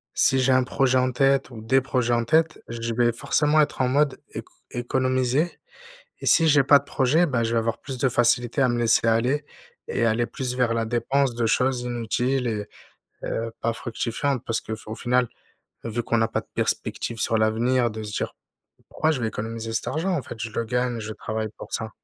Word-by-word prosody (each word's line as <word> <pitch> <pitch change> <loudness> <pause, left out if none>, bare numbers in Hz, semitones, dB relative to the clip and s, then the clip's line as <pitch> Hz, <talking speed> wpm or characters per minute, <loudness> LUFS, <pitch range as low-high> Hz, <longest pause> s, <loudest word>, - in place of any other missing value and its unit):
si 135 - +4
j'ai 130 +1 +3
un 130 0 +4
projet 130 0 +1
en 130 0 +2
tête, 135 +1 +2
ou 115 -3 -9
des 130 +4 +3
projets 125 -2 0
en 120 0 +1
tête, 160 +6 +2
je 115 0 -4
vais 120 0 +3
forcément 150 +6 +2
être 145 - -1
en 130 - +3
mode 140 +1 +1
éco - - -8 0.2
économiser. 130 +5 0 0.6
Et - - -7
si 165 -1 +5
j'ai 145 -2 +5
pas 140 +1 +7
de - - -15
projet, 145 +5 +2
bah, 120 -4 0
je 115 - -1
vais 115 - +3
avoir 115 +1 -1
plus 135 -2 -7
de 135 -2 +2
facilité 120 +2 +2
à 130 - +4
me 120 0 0
laisser 115 0 +3
aller 125 +6 +1 0.4
et - - -1
aller 115 +1 +2
plus 125 0 -4
vers 120 -3 +1
la 115 -1 0
dépense 120 +2 0
de 120 -1 0
choses 125 +2 +1
inutiles 125 +2 -1
et 105 -2 -3 0.6
heu, 115 0 -3
pas 115 - +1
fructifiantes. 120 +3 -2
Parce 115 -1 0
que 110 - -5
f 110 - -14
au 110 - -5
final, 125 0 +1 0.6
vu 115 +1 -3
qu'on 115 - 0
n'a 110 0 +2
pas - - -1
de - - -26
perspective 115 - -2
sur 115 - +2
l'avenir 120 +2 +2
de 110 0 -6
se 105 - -6
dire: - - -3 0.5
«Pourquoi 155 - 0
je 130 -6 -2
vais 110 - 0
économiser 115 +1 -5
cet - - -2
argent, 175 +5 -1
en 145 - -1
fait? 115 - -9
Je 110 0 -4
le 115 - -1
gagne, 125 0 -1
je 110 0 -5
travaille 110 0 -4
pour - - -10
ça». 110 0 -2
120 Hz, 220 wpm, -24 LUFS, 115-130 Hz, 0.6 s, pas